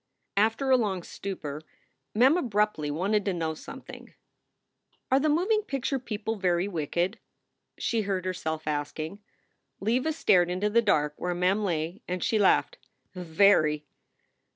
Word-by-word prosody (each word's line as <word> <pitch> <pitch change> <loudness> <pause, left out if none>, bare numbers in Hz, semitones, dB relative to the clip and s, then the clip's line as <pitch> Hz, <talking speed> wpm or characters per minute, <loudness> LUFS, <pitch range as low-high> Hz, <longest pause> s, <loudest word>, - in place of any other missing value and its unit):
After 225 +6 +2
a 260 - +7
long 195 -6 -1
stupor, 155 -8 -6 0.5
Mem 260 +7 +5
abruptly 210 - 0
wanted 195 +8 0
to 195 - 0
know 165 -2 -2
some 155 - -10
thing. - - -12 1.0
"Are 265 - +5
the 305 +2 +1
moving 380 +8 +2
picture 275 - -2
people 220 -2 -4
very 180 -1 +1
wicked?" 175 +3 -2 0.6
she 230 -2 0
heard 195 -3 -2
herself 160 -4 -3
asking. 155 +4 -3 0.6
Leva 250 +9 +1
stared 180 - +3
into 190 +4 -1
the 235 +2 +5
dark 150 -9 +2
where 180 0 -2
Mem 185 +4 +1
lay, 165 -2 -2
and 180 0 -3
she 220 - +1
laughed: 210 - +3 0.3
"Very." 160 -4 +3
195 Hz, 140 wpm, -28 LUFS, 170-225 Hz, 1.0 s, a